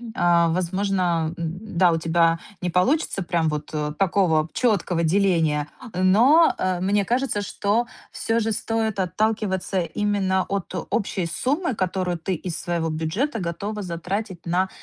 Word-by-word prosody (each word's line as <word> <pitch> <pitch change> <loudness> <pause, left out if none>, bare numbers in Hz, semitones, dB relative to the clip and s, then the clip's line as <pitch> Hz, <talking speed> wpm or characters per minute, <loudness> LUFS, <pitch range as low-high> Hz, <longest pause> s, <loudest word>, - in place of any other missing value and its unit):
а, 170 -1 +4
возможно, 180 -2 0
м, 170 +4 -5
да, 180 -1 +5
у 165 - +1
тебя 165 0 +2 0.2
не 180 -1 -1
получится 195 - +1
прям 170 -3 0
вот, 150 -1 -3
э, 150 -1 -2
такого 175 -5 +2
чёткого 185 -8 +1
деления, 165 -4 +2 0.3
но, 225 - +5
э, 185 -1 0
мне 200 +2 +2
кажется, 245 -2 0
что 210 +4 0 0.3
всё 225 +1 0
же 225 -1 0
стоит 220 -1 -1
отталкиваться 190 0 0
именно 190 0 0
от 195 -2 -3 0.2
общей 200 -6 -1
суммы, 270 - -1
которую 185 -2 -1
ты 165 +3 -3
из 175 -1 -4
своего 170 -2 -1
бюджета 165 - -1
готова 200 +4 -4
затратить 180 +2 -4
на 180 +2 +1
185 Hz, 140 wpm, -23 LUFS, 170-205 Hz, 0.3 s, да